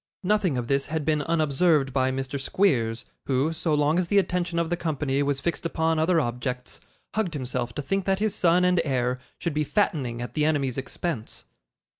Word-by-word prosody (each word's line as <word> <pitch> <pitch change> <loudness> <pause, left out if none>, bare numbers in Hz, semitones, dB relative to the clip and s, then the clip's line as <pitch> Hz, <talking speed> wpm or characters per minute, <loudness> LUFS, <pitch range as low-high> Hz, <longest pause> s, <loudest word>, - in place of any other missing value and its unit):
Nothing 190 -7 +2
of 120 - -2
this 140 +1 +1
had 155 -1 -2
been 150 -1 +2
unobserved 155 -2 +2
by 130 -1 +2
Mr. 135 +1 -3
Squeers, 125 - +1 0.2
who, 140 +4 +1
so 160 -1 0
long 150 +3 +2
as 180 - 0
the 205 - +2
attention 180 -2 +1
of 170 0 0
the - - +3
company 145 -5 -1
was 140 -1 0
fixed 170 +3 -2
upon 160 -1 0
other 165 +2 +3
objects, 125 -1 -3 0.3
hugged 200 -7 -1
himself 125 -3 -3
to 145 - -3
think 195 +6 -1
that 195 -1 +2
his 215 +1 0
son 175 +1 +3
and 180 -1 +3
heir 125 -3 0 0.2
should 170 - -3
be 150 +1 +1
fattening 140 - 0
at 120 - -5
the 150 - 0
enemy's 140 -4 +1
expense. 135 -2 -5
150 Hz, 195 wpm, -26 LUFS, 130-170 Hz, 0.3 s, the